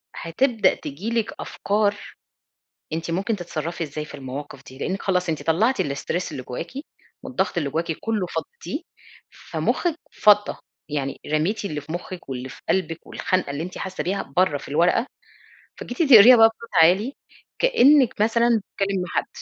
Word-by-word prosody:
هتبدأ 225 +7 +2
تيجي 155 +10 -6
لِك 230 -2 -1
أفكار 205 0 0 1.0
أنتِ 165 +1 -3
ممكن 200 +6 -1
تتصرفي 170 -2 -4
إزاي 150 +1 -5
في - - -12
المواقف 135 0 -7
دي، 130 +1 -13
لأنِك 190 +6 -3
خلاص 180 -2 0
أنتِ 155 - -2
طلعتِ 220 +11 +2
الstress 145 +5 -3
اللي 130 - -5
جواكِ 125 +7 -6 0.5
والضغط 190 -7 -1
اللي 145 -4 -1
جواكِ 165 +2 -1
كله 215 -5 -1
فضيتيه، 360 - -5 0.5
فمخِك 340 -3 -2 0.2
فضّى، 210 0 +4 0.3
يعني 140 -2 -3
رميتِ 175 +9 0
اللي 150 -6 -3
في 155 +3 -9
مخِك 175 -1 -7
واللي 130 -1 -5
في - - -12
قلبِك 165 -3 -1
والخنقة 185 -5 -1
اللي 140 +3 -3
أنتِ 180 +1 -7
حاسة 190 -1 -4
بيها 195 +2 -1
بره 180 -5 +3
في - - -11
الورقة، 175 - +2 0.7
فجيتِ 245 +7 -5
تقريها 230 +4 +10
بقى 225 0 +8
بصوت 235 - -13
عالي 200 - +3 0.5
كأنِك 285 - +4
مثلًا 235 +1 +3
بتتكلمي 195 -1 -2
مع 180 - -5
حد. - - +1
185 Hz, 160 wpm, -23 LUFS, 155-220 Hz, 1.0 s, تقريها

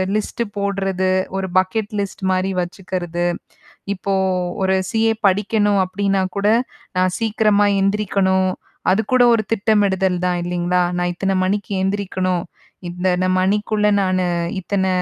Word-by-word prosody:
List 225 +3 -2
போடுறது, 195 -2 0 0.3
ஒரு 190 0 -2
bucket 205 +3 -2
list 195 0 -6
மாரி 185 +1 0
வச்சுக்கிறது, 175 -1 -4 0.7
இப்போ 195 +1 -3 0.5
ஒரு 190 0 +2 0.2
CA 225 0 +2
படிக்கணும் 205 +1 +2
அப்பிடின்னா 195 0 0
கூட 200 +1 +1 0.5
நான் 185 0 +2
சீக்கிரமா 215 -2 +2
எந்திரிக்கணும், 195 -2 +1 0.4
அதுக்கூட 225 +5 +3
ஒரு 225 - +3
திட்டமிடுதல் 195 -4 +2
தான் 180 -1 +1
இல்லீங்களா! 175 0 0 0.2
நான் 175 0 0
இத்தன 195 +2 -1
மணிக்கு 205 +1 -2
எந்திரிக்கணும், 185 -2 -1 0.5
இந்த 180 +1 -6
இந்த 185 - +1
மணிக்குள்ளே 210 +2 +1
நானு 185 -1 +1 0.4
இத்தன 190 +1 -1
195 Hz, 120 wpm, -20 LUFS, 185-205 Hz, 0.7 s, அதுக்கூட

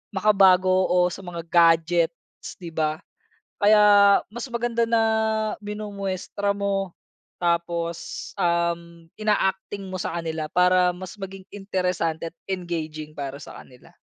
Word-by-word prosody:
makabago 185 -2 +4
o 180 0 +2
sa 175 - -7
mga 175 -3 -7
gadgets 165 0 +2
di 170 -3 -9
ba? 155 0 -2 0.5
Kaya 205 -1 +6
mas 235 +3 -7
maganda 235 0 0
na 230 0 +2 0.6
minumuestra 200 -1 -3
mo 195 -2 -2 0.5
tapos, 170 -1 -2
um, 170 -2 -1
ina-acting 200 -2 -1
mo 185 - -5
sa 180 - -3
kanila 160 -1 -4
para 180 0 +4
mas 185 +2 -9
maging 195 -1 -8
interesante 180 -5 -2
at 165 - -21 0.2
engaging 155 -4 -5
para 140 0 -5
sa - - -11
kanila. 125 -1 -17
180 Hz, 120 wpm, -24 LUFS, 170-200 Hz, 0.6 s, Kaya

